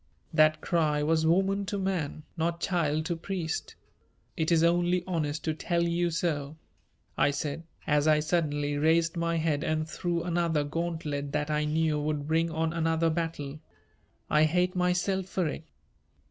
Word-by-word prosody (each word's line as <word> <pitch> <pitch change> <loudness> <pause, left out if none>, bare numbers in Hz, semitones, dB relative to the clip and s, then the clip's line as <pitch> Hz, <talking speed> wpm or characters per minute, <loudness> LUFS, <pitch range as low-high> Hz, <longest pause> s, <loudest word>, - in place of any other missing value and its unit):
"That 155 0 +4
cry 155 -4 +1
was 160 +1 +2
woman 195 +4 +2
to 205 - -2
man, 180 -6 -2
not 170 0 -1
child 155 -4 0
to 170 0 -1
priest. 170 -1 -4 0.6
It 160 +1 0
is 165 -1 +4
only 175 +1 +2
honest 155 -4 -2
to 160 - 0
tell 170 +2 0
you 170 +1 +1
so," 155 -3 -2 0.6
I - - +5
said, 145 +3 -3 0.2
as 150 0 +2
I 155 -1 +5
suddenly 145 -3 0
raised 165 +2 +3
my 170 0 0
head 155 -2 0
and 155 0 -1
threw 170 0 -2
another 170 -3 +1
gauntlet 150 -2 -3
that 150 0 -1
I 150 0 +1
knew 155 0 +1
would 150 -1 -2
bring 165 +1 +2
on 160 0 -1
another 165 0 +1
battle. 155 -3 -3 0.7
"I 150 +1 +4
hate 180 +3 +1
myself 180 +1 +1
for 185 -3 -1
it." 155 - -5
160 Hz, 160 wpm, -29 LUFS, 150-170 Hz, 0.7 s, I